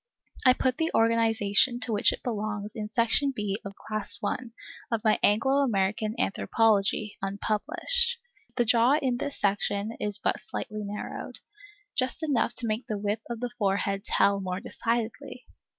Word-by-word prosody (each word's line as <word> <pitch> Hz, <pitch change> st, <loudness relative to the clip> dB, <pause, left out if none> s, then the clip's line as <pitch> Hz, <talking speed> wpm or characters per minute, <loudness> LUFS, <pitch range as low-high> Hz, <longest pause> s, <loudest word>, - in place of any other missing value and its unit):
I 255 Hz, -, +9 dB
put 255 Hz, 0 st, 0 dB
the 325 Hz, 0 st, +1 dB
organization 225 Hz, +1 st, +3 dB
to 240 Hz, -, -1 dB
which 205 Hz, -, +4 dB
it -, -, -7 dB
belongs 210 Hz, -2 st, -3 dB
in 215 Hz, -3 st, -4 dB
Section 235 Hz, +5 st, +1 dB
B 205 Hz, -1 st, -2 dB
of 200 Hz, 0 st, -8 dB
Class 215 Hz, -1 st, -4 dB
1 235 Hz, +3 st, -3 dB, 0.4 s
of 230 Hz, -2 st, -1 dB
my 215 Hz, -, +3 dB
Anglo 230 Hz, +7 st, +3 dB
American 215 Hz, -4 st, +1 dB
Anthropology 215 Hz, -2 st, +1 dB
(unpublished). 220 Hz, -, 0 dB, 0.4 s
The 240 Hz, -, +2 dB
jaw 235 Hz, +3 st, +5 dB
in 255 Hz, -4 st, 0 dB
this 285 Hz, +2 st, -4 dB
section 205 Hz, +1 st, 0 dB
is 205 Hz, -1 st, -1 dB
but -, -, -1 dB
slightly 215 Hz, 0 st, -5 dB
narrowed, 205 Hz, +1 st, -6 dB, 0.6 s
just 260 Hz, +4 st, -1 dB
enough 280 Hz, -6 st, +1 dB
to 240 Hz, -, +3 dB
make 225 Hz, +2 st, -2 dB
the 215 Hz, -, -2 dB
width 205 Hz, +2 st, -2 dB
of 235 Hz, -1 st, -5 dB
the 245 Hz, -1 st, -2 dB
forehead 195 Hz, -1 st, 0 dB
tell 200 Hz, -2 st, +3 dB
more 185 Hz, -1 st, -3 dB
decidedly. 230 Hz, +1 st, -3 dB
220 Hz, 155 wpm, -28 LUFS, 205-240 Hz, 0.6 s, I